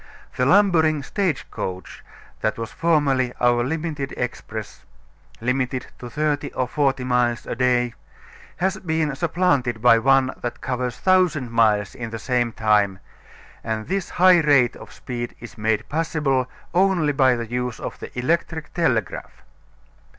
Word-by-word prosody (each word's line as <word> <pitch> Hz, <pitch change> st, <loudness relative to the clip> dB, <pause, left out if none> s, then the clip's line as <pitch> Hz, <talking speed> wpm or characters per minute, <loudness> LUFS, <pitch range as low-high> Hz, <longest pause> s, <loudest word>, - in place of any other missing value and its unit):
The 125 Hz, -, +1 dB
lumbering 160 Hz, -6 st, +4 dB
stage 180 Hz, -8 st, -1 dB
coach 90 Hz, -1 st, -6 dB, 0.4 s
that -, -, -1 dB
was 115 Hz, 0 st, -5 dB
formerly 140 Hz, -6 st, +1 dB
our 120 Hz, -1 st, +3 dB
limited 155 Hz, 0 st, -3 dB
express 110 Hz, -3 st, -5 dB, 0.6 s
limited 125 Hz, +1 st, -1 dB
to 120 Hz, -, -8 dB
thirty 145 Hz, +1 st, -1 dB
or 130 Hz, -, -1 dB
forty 135 Hz, -2 st, 0 dB
miles 125 Hz, -2 st, +1 dB
a -, -, -3 dB
day 125 Hz, -1 st, +1 dB, 0.6 s
has 190 Hz, +3 st, 0 dB
been 160 Hz, -5 st, -1 dB
supplanted 145 Hz, -7 st, +1 dB
by 115 Hz, 0 st, +6 dB
one 135 Hz, +1 st, +3 dB
that 120 Hz, -, -4 dB
covers 125 Hz, -1 st, -3 dB
1000 175 Hz, -9 st, +2 dB
miles 105 Hz, -4 st, +2 dB
in 120 Hz, -3 st, -6 dB
the 115 Hz, -, -5 dB
same 120 Hz, +1 st, 0 dB
time, 105 Hz, -3 st, +2 dB, 0.7 s
and 110 Hz, -1 st, -3 dB
this 195 Hz, -2 st, -2 dB
high 180 Hz, -1 st, +5 dB
rate 140 Hz, -6 st, +4 dB
of -, -, -12 dB
speed 120 Hz, -1 st, -6 dB
is 120 Hz, -, -10 dB
made 110 Hz, 0 st, -1 dB
possible 150 Hz, -5 st, 0 dB, 0.3 s
only 180 Hz, -5 st, +2 dB
by 130 Hz, -2 st, +4 dB
the 120 Hz, -1 st, -4 dB
use 125 Hz, -1 st, -3 dB
of -, -, -6 dB
the -, -, -7 dB
electric 160 Hz, +4 st, -1 dB
telegraph. 115 Hz, -, -1 dB
130 Hz, 145 wpm, -22 LUFS, 120-155 Hz, 0.7 s, by